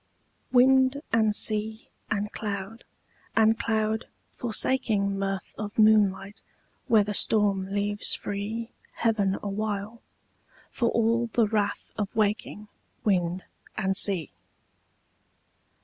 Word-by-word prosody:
WIND 260 +2 +4
and 220 -2 +3
sea 220 +1 -1 0.2
and 210 0 -1
cloud 205 +1 -5 0.5
and 225 0 +4
cloud 220 -1 -1 0.2
forsaking 215 -4 +1
Mirth 195 -1 -3
of 205 -1 -6
moonlight 210 -2 +3 0.5
where 225 -5 +5
the 205 +1 -4
storm 200 -2 +2
leaves 205 +1 +1
free 220 +3 -5 0.2
Heaven 205 -4 +1
awhile, 210 +2 -3 0.7
for 235 -2 0
all 230 +1 +1
the 230 0 +2
wrath 205 -1 -2
of 205 -2 -3
waking 210 0 -1 0.4
Wind 180 -3 0 0.3
and 190 -2 0
sea. 190 -5 0
210 Hz, 100 wpm, -26 LUFS, 200-225 Hz, 0.7 s, where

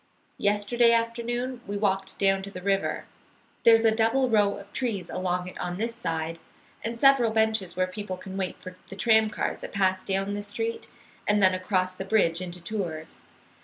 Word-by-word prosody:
"Yesterday 210 +4 +3
afternoon 240 +2 -1
we 205 0 -3
walked 195 -2 0
down 195 -1 +2
to 195 - -7
the 185 -2 -9
river. 195 0 0 0.6
There's 225 0 +6
a 220 - +5
double 235 +4 +2
row 205 -2 +3
of 200 - -13
trees 225 -8 -2
along 180 -1 -1
it 185 - -9
on 175 0 -3
this 230 +3 -2
side, 165 -6 -3 0.4
and 230 +1 -4
several 270 -3 +5
benches 220 -4 +1
where 185 0 +2
people 185 0 -6
can 190 +1 -9
wait 190 -2 -3
for 185 0 -9
the 195 - -8
tram 220 +1 +4
cars - - -2
that - - -8
pass 190 -1 +1
down 195 +1 -1
this 205 0 -4
street 225 +2 -3 0.4
and 210 0 +3
then 190 -2 +5
across 185 0 0
the 185 - -6
bridge 190 -4 +2
into 180 -1 -6
Tours. 170 -6 -5
200 Hz, 185 wpm, -27 LUFS, 185-225 Hz, 0.6 s, There's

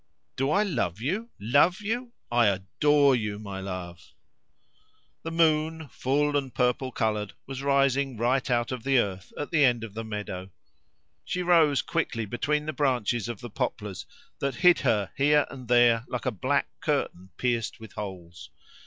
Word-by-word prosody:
"Do 135 +2 0
I 200 +7 +3
love 115 - -1
you 190 - -2
love 145 - +3
you? 235 +4 -3 0.2
I 120 -2 +4
adore 140 +9 +3
you, 105 -3 -2
my 100 -2 -6
love." 90 -3 -7 1.1
The 165 - -5
moon, 160 -1 +1
full 145 +5 0
and 135 -2 -1
purple 125 +1 0
coloured, 105 -4 -1
was 135 0 -6
rising 140 -2 +2
right 125 +4 +1
out 120 0 +1
of 130 -2 -4
the 135 -1 +3
earth 95 -5 -1
at 145 - -4
the 155 -3 +4
end 120 -4 +3
of 110 -3 -7
the 115 +1 -5
meadow. 105 -4 -5 0.7
She 180 - -2
rose 160 -6 +4
quickly 120 -9 -2
between 150 +7 -1
the 155 - -3
branches 120 -5 0
of 115 -4 -6
the 120 - -8
poplars, 105 -6 -4 0.3
that 140 -2 -1
hid 180 +4 +5
her 110 -7 +1
here 150 +1 +4
and 130 -3 -9
there 120 -1 +4
like 125 - -4
a 130 - +1
black 100 - 0
curtain 90 +2 -2
pierced 120 -3 -1
with 110 -1 -11
holes. 90 -5 -8
125 Hz, 165 wpm, -27 LUFS, 110-145 Hz, 1.1 s, hid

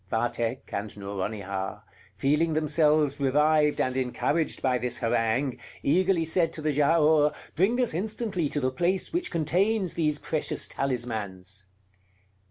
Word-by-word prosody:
Vathek 120 +1 -2
and 105 +1 -4
Nouronihar, 100 -1 -4 0.3
feeling 150 +4 +1
themselves 150 -2 +2
revived 150 +2 +3
and 130 0 0
encouraged 130 +5 -1
by 130 -2 +1
this 125 0 -2
harangue, 120 +2 0 0.2
eagerly 175 +2 +2
said 165 +1 +1
to 155 - -7
the 155 - +1
Giaour: 150 +1 +3 0.2
"Bring 200 +9 +2
us 245 -8 +1
instantly 190 -3 -1
to 145 - -1
the 130 -2 0
place 180 - -1
which 345 +1 -1
contains 185 +4 +1
these 150 -3 0
precious 155 0 -1
talismans." 100 -7 -4
150 Hz, 130 wpm, -27 LUFS, 120-165 Hz, 0.3 s, revived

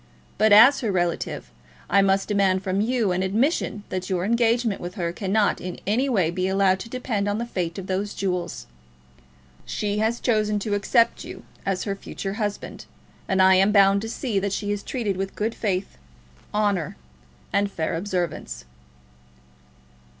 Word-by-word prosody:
But, 215 0 +4
as 230 +7 +8
her 225 -5 -1
relative, 175 - -2 0.4
I 200 +2 +4
must 195 0 +2
demand 195 -2 +2
from 190 +1 0
you 230 -3 +1
an 180 +1 0
admission 215 - 0
that 185 -1 -4
your 185 -1 0
engagement 230 -1 +1
with 175 +2 -6
her 170 -4 -2
cannot 200 +3 +1
in 180 -1 -5
any 245 +7 +1
way 185 -9 +2
be 185 +1 -1
allowed 190 0 +2
to 230 - -8
depend 230 -5 -2
on 205 - -1
the 235 - -2
fate 175 -7 -3
of 190 - -5
those 195 +2 -2
jewels. 180 - -3 1.0
She 210 0 -2
has 225 +2 0
chosen 215 -3 +1
to 205 0 -2
accept 230 +3 +2
you - - -9 0.2
as 190 -2 0
her 200 -2 -2
future 195 0 -6
husband, 205 -1 -4 0.4
and 190 -1 +3
I 190 0 +7
am 195 +2 +4
bound 200 -1 +5
to 225 - -5
see 225 -4 -1
that 200 0 -2
she 205 0 -2
is 205 -1 -2
treated 215 -7 -3
with 195 0 -4
good 220 +2 -1
faith, 190 - -3 0.5
honour, 205 - 0 0.6
and 200 0 +2
fair 160 -4 -2
observance." 175 - -3
200 Hz, 170 wpm, -24 LUFS, 185-215 Hz, 1.0 s, as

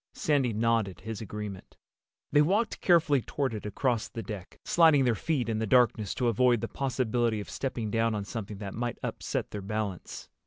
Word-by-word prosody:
Sandy 140 -5 +1
nodded 110 -3 0
his 110 -2 -6
agreement. 105 -2 -7 0.5
They 145 - +6
walked 200 +9 +1
carefully 160 -6 +4
toward 135 +1 -2
it 105 -1 -5
across 120 +1 0
the 115 - -6
deck, 105 -5 -8
sliding 160 -5 +5
their 120 - +3
feet 125 +1 -1
in 110 -1 -1
the 110 - -1
darkness 110 -3 +3
to 125 - 0
avoid 120 0 +3
the - - -2
possibility 120 -4 0
of 100 - -7
stepping 120 -5 -3
down 115 0 +1
on 100 -1 -3
something 105 0 -6
that 100 -1 -6
might 120 0 -3
upset - - -3
their 105 - -5
balance. 100 -2 -4
115 Hz, 185 wpm, -29 LUFS, 105-130 Hz, 0.5 s, They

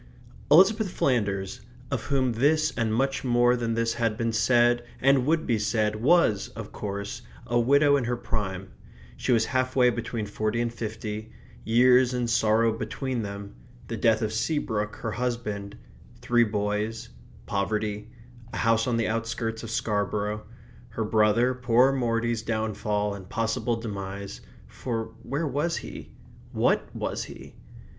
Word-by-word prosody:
Elizabeth 195 +7 +5
Flanders, 100 - -1 0.3
of 130 -5 -2
whom 130 -3 +1
this 155 +6 +2
and 115 -2 0
much 135 +5 0
more 120 -1 +3
than 115 -2 -1
this 115 0 +1
had 115 -2 -1
been 115 -1 -1
said 120 +1 +3 0.2
and 135 -1 +3
would 160 +1 +2
be 115 -3 +1
said, 105 0 0
was, 120 - +3
of - - -7
course, 100 +3 -5 0.2
a 120 0 +1
widow 140 +4 +4
in 130 - -1
her 120 +1 -1
prime. 95 -5 -4 0.4
She - - -2
was 115 -2 +4
half 130 +1 -1
way 125 -2 +5
between 115 -1 -4
forty 110 +2 -2
and 120 0 -1
fifty. 110 -1 -5 0.3
Years 125 +2 +4
and 120 -1 0
sorrow 115 0 +3
between 130 +1 -3
them; 100 -1 -6 0.4
the 115 - -2
death 110 +1 +2
of 110 0 -1
Seabrook, 110 -5 -1
her 115 - -4
husband; 105 -3 -3 0.4
three 120 -1 +3
boys; 105 +1 -2 0.4
poverty; 105 +1 -2 0.4
a - - -3
house 115 +1 +2
on 120 -2 +1
the 115 - +1
outskirts 115 0 -2
of 115 - -7
Scarborough; 105 -1 -1 0.4
her 115 0 -3
brother, 110 +3 +3
poor 125 +1 +3
Morty's, 115 -3 0
downfall 105 -2 -1
and 95 -2 -10
possible 115 +1 -1
demise 100 -3 -6 0.2
for 115 -3 -5
where 145 +4 -2
was 150 +4 -1
he? - - -8 0.4
what - - +2
was - - -3
he? - - -11
115 Hz, 150 wpm, -26 LUFS, 105-125 Hz, 0.4 s, Elizabeth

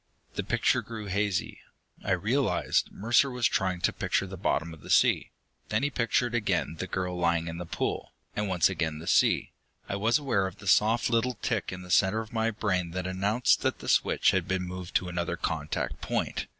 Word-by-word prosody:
The - - -2
picture - - +1
grew 110 -2 -7
hazy; 100 -1 -1 0.4
I 95 - +1
realized 115 +10 +1
Mercer 120 +6 +3
was 125 -2 -1
trying 90 -2 -1
to - - +2
picture - - 0
the - - -7
bottom 80 +2 -1
of 80 - -13
the - - -12
sea. - - +4 0.4
Then 110 +4 0
he 145 - +1
pictured 120 -1 +1
again 105 -8 0
the 95 - -3
girl 90 -1 -2
lying 85 -1 +1
in 85 +1 -5
the 90 - -6
pool, - - -3 0.2
and 105 0 -1
once 90 -3 +4
again 80 -4 -2
the 80 - -9
sea. - - +3 0.4
I 100 - -2
was 115 +4 +3
aware 120 -10 0
of 95 +1 -9
the 105 - -13
soft 110 +5 +3
little 120 +2 +1
tick 110 -6 -1
in 90 0 -7
the 90 - -9
center 95 +5 +4
of 110 0 -7
my 115 0 +1
brain 100 -5 -1
that 90 -1 -3
announced 100 +6 +2
that - - 0
the - - -10
switch - - +3
had - - 0
been 95 -1 -1
moved 90 0 -7
to 90 - +2
another 85 0 -2
contact 80 -2 -3
point. - - -2
95 Hz, 205 wpm, -28 LUFS, 90-110 Hz, 0.4 s, sea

